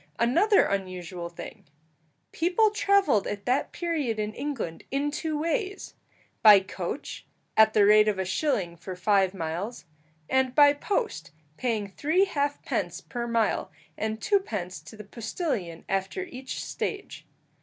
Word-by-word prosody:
Another 345 Hz, -, +4 dB
unusual 185 Hz, -3 st, -4 dB
thing. 170 Hz, -, -10 dB, 0.7 s
People 370 Hz, +6 st, +2 dB
travelled 400 Hz, -, +3 dB
at 205 Hz, -1 st, -5 dB
that 255 Hz, +3 st, +1 dB
period 310 Hz, -10 st, -2 dB
in 215 Hz, 0 st, -2 dB
England 260 Hz, -, -4 dB
in 280 Hz, +2 st, -1 dB
two 305 Hz, +1 st, -2 dB
ways 380 Hz, +6 st, -2 dB, 0.5 s
by 210 Hz, -3 st, +9 dB
coach, 190 Hz, +6 st, -6 dB, 0.3 s
at 220 Hz, 0 st, +6 dB
the 210 Hz, -2 st, +6 dB
rate 210 Hz, +1 st, +6 dB
of 210 Hz, -2 st, +1 dB
a 190 Hz, -, -1 dB
shilling 185 Hz, -, -1 dB
for 180 Hz, +2 st, -8 dB
five 195 Hz, 0 st, +2 dB
miles; 180 Hz, +7 st, -4 dB, 0.4 s
and 260 Hz, -1 st, +1 dB
by 290 Hz, -1 st, +7 dB
post, 340 Hz, -, -2 dB, 0.3 s
paying 220 Hz, -1 st, -1 dB
three 315 Hz, -, +1 dB
half 290 Hz, -5 st, -2 dB
pence -, -, -2 dB
per 240 Hz, -2 st, -5 dB
mile, 230 Hz, -2 st, 0 dB, 0.3 s
and 220 Hz, 0 st, -3 dB
twopence 210 Hz, -, -1 dB
to 160 Hz, +8 st, -13 dB
the 210 Hz, -, -8 dB
postillion 215 Hz, -, -4 dB
after 195 Hz, -, -2 dB
each 265 Hz, -7 st, -6 dB
stage. 405 Hz, -2 st, -5 dB
230 Hz, 140 wpm, -27 LUFS, 195-300 Hz, 0.7 s, by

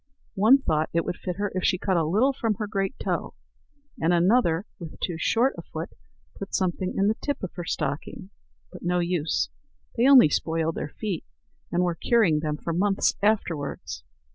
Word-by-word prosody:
One 220 Hz, +7 st, +6 dB
thought 155 Hz, 0 st, +1 dB
it 170 Hz, 0 st, +1 dB
would -, -, -3 dB
fit 180 Hz, -2 st, -4 dB
her 205 Hz, +1 st, -2 dB
if 185 Hz, 0 st, -2 dB
she 185 Hz, -, +2 dB
cut 190 Hz, +1 st, 0 dB
a 165 Hz, -, +3 dB
little 215 Hz, -, +2 dB
from 225 Hz, -4 st, -1 dB
her 210 Hz, -, -3 dB
great 195 Hz, -2 st, -2 dB
toe; -, -, -3 dB, 0.7 s
and 165 Hz, +2 st, +3 dB
another, 175 Hz, 0 st, +3 dB
with 165 Hz, -3 st, -9 dB
too 175 Hz, -3 st, -2 dB
short 240 Hz, +9 st, +2 dB
a -, -, -4 dB
foot, -, -, -7 dB, 0.5 s
put 200 Hz, -, -4 dB
something 185 Hz, 0 st, -1 dB
in 195 Hz, -, +3 dB
the 220 Hz, -, +1 dB
tip 285 Hz, -6 st, -3 dB
of 185 Hz, -, -4 dB
her 175 Hz, -1 st, -6 dB
stocking. 165 Hz, +6 st, -4 dB, 0.4 s
But 180 Hz, -, -11 dB
no 180 Hz, +1 st, 0 dB
use; 170 Hz, -3 st, 0 dB, 0.5 s
they 240 Hz, +2 st, +3 dB
only 265 Hz, -, +8 dB
spoiled 165 Hz, +2 st, 0 dB
their 150 Hz, -, -4 dB
feet, 195 Hz, -1 st, -4 dB, 0.5 s
and 175 Hz, +1 st, +2 dB
were 175 Hz, -1 st, +1 dB
curing 180 Hz, -3 st, +2 dB
them 150 Hz, -1 st, -2 dB
for 170 Hz, -, -4 dB
months 195 Hz, +3 st, +2 dB
afterwards. 185 Hz, -9 st, -1 dB
180 Hz, 190 wpm, -26 LUFS, 165-210 Hz, 0.7 s, only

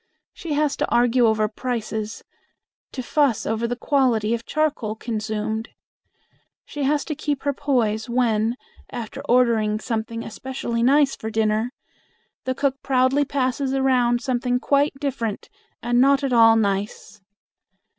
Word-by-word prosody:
She 325 Hz, -3 st, -5 dB
has 295 Hz, -1 st, +1 dB
to -, -, -1 dB
argue 240 Hz, 0 st, +3 dB
over 215 Hz, -1 st, +2 dB
prices; 220 Hz, -1 st, -4 dB, 0.7 s
to 255 Hz, -, -5 dB
fuss 275 Hz, -3 st, +1 dB
over 225 Hz, +1 st, -1 dB
the 245 Hz, -, -2 dB
quality 245 Hz, -5 st, +1 dB
of 230 Hz, 0 st, -4 dB
charcoal 290 Hz, -8 st, -1 dB
consumed. 220 Hz, 0 st, -3 dB, 1.0 s
She 290 Hz, -2 st, -4 dB
has 290 Hz, 0 st, +1 dB
to 310 Hz, -, -3 dB
keep 290 Hz, -1 st, -3 dB
her 285 Hz, 0 st, 0 dB
poise 240 Hz, -6 st, 0 dB
when, 230 Hz, -2 st, +1 dB, 0.3 s
after 225 Hz, -3 st, -6 dB
ordering 225 Hz, -4 st, +3 dB
something 230 Hz, 0 st, -3 dB
especially 235 Hz, 0 st, -4 dB
nice 275 Hz, +3 st, +4 dB
for 220 Hz, -, -6 dB
dinner, 220 Hz, +1 st, 0 dB, 0.7 s
the 260 Hz, -, -1 dB
cook 275 Hz, -1 st, -1 dB
proudly 265 Hz, +2 st, +2 dB
passes 265 Hz, 0 st, -1 dB
around 250 Hz, -3 st, +2 dB
something 250 Hz, -1 st, 0 dB
quite 285 Hz, +3 st, +2 dB
different 245 Hz, -7 st, -3 dB, 0.3 s
and 240 Hz, +1 st, +2 dB
not 275 Hz, +1 st, +4 dB
at 270 Hz, -2 st, 0 dB
all 225 Hz, -1 st, +7 dB
nice. 205 Hz, 0 st, -2 dB
245 Hz, 135 wpm, -23 LUFS, 220-270 Hz, 1.0 s, all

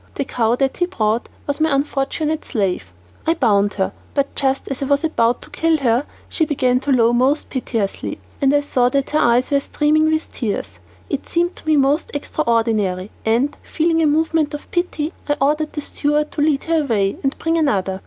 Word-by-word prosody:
The 280 Hz, -, -2 dB
cow 235 Hz, -2 st, +1 dB
that 270 Hz, +1 st, 0 dB
he 355 Hz, -, +1 dB
brought 225 Hz, -, -1 dB, 0.2 s
was 285 Hz, +1 st, -2 dB
my 315 Hz, -, +3 dB
unfortunate 295 Hz, +2 st, -1 dB
slave. 185 Hz, -, -2 dB, 0.4 s
I 330 Hz, -, +3 dB
bound 205 Hz, -8 st, +2 dB
her, 190 Hz, -2 st, -1 dB, 0.2 s
but 280 Hz, -1 st, 0 dB
just 270 Hz, -1 st, 0 dB
as 275 Hz, -1 st, -4 dB
I -, -, 0 dB
was 280 Hz, +3 st, +1 dB
about 245 Hz, -7 st, +1 dB
to -, -, -14 dB
kill 325 Hz, -1 st, +2 dB
her 250 Hz, -1 st, +1 dB, 0.2 s
she 325 Hz, -, 0 dB
began 255 Hz, -4 st, +1 dB
to 275 Hz, +2 st, -2 dB
low 235 Hz, -2 st, +4 dB
most 260 Hz, +5 st, +1 dB
piteously, 230 Hz, -6 st, -2 dB, 0.2 s
and 275 Hz, -1 st, +4 dB
I 290 Hz, 0 st, +3 dB
saw 250 Hz, -4 st, +2 dB
that 275 Hz, +1 st, -1 dB
her 305 Hz, -, +2 dB
eyes 240 Hz, +3 st, +3 dB
were 280 Hz, -, +4 dB
streaming 300 Hz, +2 st, +2 dB
with 315 Hz, 0 st, -2 dB
tears. 220 Hz, -5 st, -3 dB, 0.4 s
It -, -, -4 dB
seemed 345 Hz, +1 st, 0 dB
to -, -, -13 dB
me 310 Hz, -1 st, +4 dB
most 280 Hz, +3 st, +2 dB
extraordinary, 225 Hz, -9 st, 0 dB, 0.2 s
and, 240 Hz, +6 st, +2 dB
feeling 325 Hz, 0 st, 0 dB
a 315 Hz, -, +4 dB
movement 315 Hz, 0 st, +1 dB
of 295 Hz, -, -10 dB
pity, 345 Hz, -2 st, -1 dB, 0.2 s
I 290 Hz, -, +2 dB
ordered 300 Hz, +2 st, +1 dB
the 295 Hz, -, -3 dB
steward 295 Hz, +1 st, -1 dB
to 300 Hz, -, -2 dB
lead 295 Hz, -2 st, +2 dB
her 325 Hz, -1 st, +1 dB
away 205 Hz, -7 st, 0 dB
and 270 Hz, 0 st, -1 dB
bring 330 Hz, 0 st, 0 dB
another. 195 Hz, -, 0 dB
280 Hz, 200 wpm, -20 LUFS, 235-305 Hz, 0.4 s, low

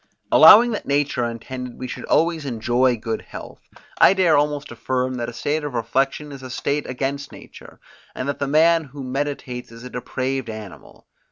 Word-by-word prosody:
Allowing 235 Hz, +3 st, +8 dB
that 215 Hz, -, -4 dB
nature 140 Hz, -3 st, 0 dB
intended 125 Hz, +2 st, -6 dB
we 130 Hz, -, -6 dB
should -, -, -7 dB
always 165 Hz, 0 st, +1 dB
enjoy 120 Hz, 0 st, +1 dB
good 110 Hz, 0 st, -4 dB
health, -, -, -11 dB, 0.4 s
I 195 Hz, -, +7 dB
dare 180 Hz, -4 st, +4 dB
almost 145 Hz, -1 st, 0 dB
affirm 130 Hz, +2 st, -2 dB
that 120 Hz, -1 st, -3 dB
a -, -, -7 dB
state 150 Hz, +6 st, -2 dB
of 145 Hz, -4 st, -5 dB
reflection 135 Hz, +5 st, -1 dB
is 140 Hz, -1 st, -9 dB
a 130 Hz, -, -8 dB
state 140 Hz, +3 st, -2 dB
against 140 Hz, +2 st, -3 dB
nature, -, -, -14 dB, 0.4 s
and 130 Hz, -, -4 dB
that 140 Hz, -, -3 dB
the 140 Hz, -, -1 dB
man 160 Hz, +3 st, +4 dB
who 140 Hz, 0 st, -9 dB
meditates 130 Hz, -2 st, -4 dB
is 115 Hz, +1 st, -12 dB
a 125 Hz, -, -9 dB
depraved 130 Hz, 0 st, -3 dB
animal. 110 Hz, -4 st, -10 dB
135 Hz, 180 wpm, -22 LUFS, 125-145 Hz, 0.4 s, Allowing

